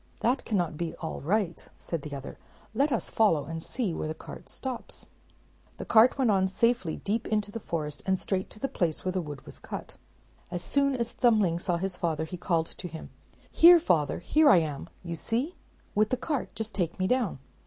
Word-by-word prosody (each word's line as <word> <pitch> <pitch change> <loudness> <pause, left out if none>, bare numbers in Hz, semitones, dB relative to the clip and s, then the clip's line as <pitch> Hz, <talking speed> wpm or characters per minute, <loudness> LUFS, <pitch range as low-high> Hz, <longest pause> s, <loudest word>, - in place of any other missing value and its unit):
"That 250 +4 +1
cannot 175 -7 0
be 170 -1 -3
all 160 - -5
right," 185 +2 0
said 165 -3 -4
the 145 -1 -6
other: 135 -1 -8 0.3
"let 280 +6 +2
us 235 - -1
follow 165 -11 +3
and 165 +2 -5
see 215 -1 -2
where 155 - -3
the 155 - -4
cart - - -10
stops." 260 -3 -5 0.7
The - - -6
cart 230 +4 +6
went 255 -5 +3
on 190 -1 +3
safely 195 -3 +1
deep 220 +3 -2
into 210 -1 0
the 230 - -5
forest, 155 -7 -4
and 190 0 +3
straight 190 0 -2
to - - -12
the 275 - -1
place 170 - -1
where 185 - +1
the 185 0 -1
wood 145 -4 -8
was - - -9
cut. - - -7 0.5
As 175 -1 -4
soon 280 +5 +2
as 235 -2 -2
Thumbling 210 -9 +3
saw 175 -1 0
his 185 0 -3
father, 160 -2 -1
he 170 - -6
called 170 -2 0
to 180 - -8
him, 160 -1 -9 0.4
"Here, 345 +1 +9
father; 155 - +1
here 300 - +4
I 190 - +8
am, 150 -4 -2
you 170 -1 -4
see, 245 - -1 0.4
with 215 +1 +3
the 255 - +1
cart; 285 +1 -3
just 220 -1 -4
take 175 -4 -1
me 185 - 0
down." 240 - +1
190 Hz, 205 wpm, -28 LUFS, 165-235 Hz, 0.7 s, Here